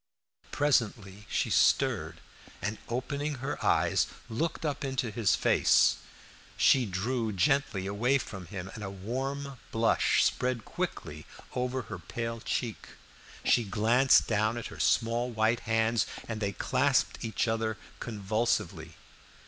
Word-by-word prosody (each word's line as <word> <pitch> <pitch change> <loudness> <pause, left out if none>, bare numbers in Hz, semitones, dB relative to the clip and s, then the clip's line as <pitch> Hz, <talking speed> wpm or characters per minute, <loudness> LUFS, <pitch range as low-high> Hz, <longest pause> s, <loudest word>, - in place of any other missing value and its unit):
Presently 105 -8 0
she - - 0
stirred, - - +2 0.4
and 105 +1 -3
opening 140 +5 -2
her 135 +2 -4
eyes, - - +3 0.2
looked 160 +8 -2
up 145 -1 -2
into 130 -4 -2
his 105 -2 +2
face. - - +4 0.6
She 130 -4 +4
drew 110 +5 -1
gently 105 0 +1
away 115 +8 +2
from 100 -8 -7
him, 95 0 -6
and 110 - -7
a 95 - -4
warm 130 +7 -4
blush 115 0 +3
spread 125 -3 0
quickly 75 +1 -5 0.3
over 125 0 -2
her - - -7
pale 115 -1 -4
cheek; 115 0 -3 0.6
she 120 - +4
glanced 115 +6 +4
down 110 +1 +1
at 120 - -5
her - - -11
small 120 +2 +2
white 115 0 +1
hands 115 0 +2 0.2
and 110 -2 -4
they 100 -1 0
clasped 130 +7 +1
each 115 +1 -1
other 110 -1 -1 0.2
convulsively. 100 -6 -2
115 Hz, 130 wpm, -29 LUFS, 105-130 Hz, 0.6 s, face